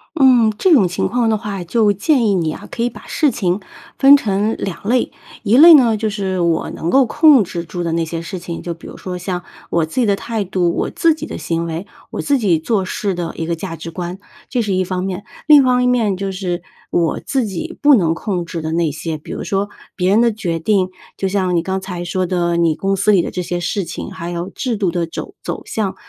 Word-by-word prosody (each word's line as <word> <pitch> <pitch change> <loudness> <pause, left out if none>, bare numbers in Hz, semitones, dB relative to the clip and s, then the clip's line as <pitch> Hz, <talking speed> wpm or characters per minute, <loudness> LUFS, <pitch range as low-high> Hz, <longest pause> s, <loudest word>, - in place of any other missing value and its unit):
嗯， 250 -7 +5
这 375 - +3
种 240 - +6
情 175 - -1
况 235 +3 0
的 220 -1 +2
话 200 -4 -5
就 210 +4 +2
建 230 - +2
议 200 - +2
你 165 -4 0
啊， - - -10
可 235 - -3
以 240 - +1
把 - - -13
事 300 -4 +2
情 185 -4 -1 0.4
分 275 +1 +8
成 210 -4 0
两 195 +1 -5
类。 245 +2 +1 0.3
一 225 +2 +3
类 330 +4 +10
呢， 240 -7 +5
就 220 +1 -1
是 195 -3 -2
我 170 -2 +1
能 165 - -3
够 270 - +6
控 295 -3 +6
制 170 -2 -5
住 175 +1 -5
的 170 - -1
那 165 0 0
些 165 +1 -4
事 185 +3 -6
情， 170 -1 -6
就 170 -1 -5
比 165 - -16
如 - - -9
说， 180 -1 -6
像 180 0 -4 0.3
我 170 -2 +2
自 160 - -3
己 245 - +3
的 200 -2 +2
态 225 +1 -3
度、 180 -2 0
我 - - -1
自 330 -2 +2
己 310 0 -6
的 - - -7
行 165 0 -2
为、 165 +4 -5 0.2
我 - - -3
自 285 -1 +2
己 190 -9 +2
做 190 +4 0
事 200 -1 -2
的 175 -1 -4
一 165 - -4
个 170 - 0
价 165 0 -6
值 165 - -8
观， 175 +2 -6 0.3
这 245 - 0
是 210 -3 -1
一 185 - +1
方 185 0 -3
面。 190 +1 -4 0.2
另 300 -2 +8
一 - - 0
方 250 0 +3
面 225 -6 +2
就 195 +1 -3
是， 180 -2 -3 0.3
我 170 -2 +1
自 270 -3 -1
己 190 -6 -5
不 290 -1 +7
能 170 -7 +2
控 175 0 -3
制 170 -1 -5
的 160 0 -3
那 165 -1 +1
些， 160 +2 -4
比 150 - -11
如 - - -4
说， 200 +1 -1 0.3
别 185 0 +1
人 215 +3 +5
的 235 -1 +3
决 180 -6 -3
定， 185 +1 +1 0.3
就 195 - -1
像 185 -2 0
你 165 - +1
刚 190 +1 -2
才 180 -2 -5
说 185 +1 -1
的 175 -1 0
你 170 -2 +2
公 195 +3 0
司 200 +2 +2
里 190 -4 +4
的 - - -4
这 180 - -3
些 175 0 -3
事 190 +3 -1
情， 175 +3 -6
还 180 -3 -6
有 175 0 -4
制 245 -1 -2
度 195 -4 0
的 170 -1 -1
肘 165 - -7
走 - - -5
向。 205 -4 -2
190 Hz, 270 characters per minute, -18 LUFS, 170-220 Hz, 0.4 s, 类